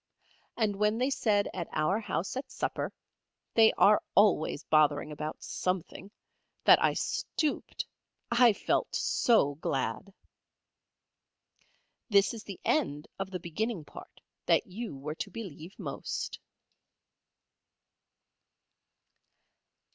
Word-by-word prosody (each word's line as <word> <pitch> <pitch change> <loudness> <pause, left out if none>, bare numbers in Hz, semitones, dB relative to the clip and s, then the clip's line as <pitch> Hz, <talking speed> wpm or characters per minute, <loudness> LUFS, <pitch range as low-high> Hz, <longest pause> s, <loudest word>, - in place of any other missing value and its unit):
And 210 -4 +1
when 210 +2 +2
they 255 +3 +1
said 210 -6 +2
at 175 -3 -4
our 155 +7 +1
house 205 -3 -3
at 265 - -5
supper - - -3 0.6
(they 225 -1 +6
are 210 +1 +5
always 200 -6 +3
bothering 150 -1 +3
about 150 +1 -6
something) 185 +1 -3 0.5
that - - +7
I - - +3
stooped, 310 -2 -2 0.5
I 235 0 +6
felt 205 - -1
so 220 - +3
glad! 130 - -2 2.0
This 200 0 +4
is 225 -2 -8
the 195 -3 -8
end 145 +1 0
of 195 0 -3
the 185 -1 -4
beginning 175 +1 -3
part - - -13 0.3
that - - +4
you 215 -2 -6
were 150 +3 -5
to - - -5
believe 190 -5 -9
most. - - -5
195 Hz, 110 wpm, -30 LUFS, 155-220 Hz, 2.0 s, that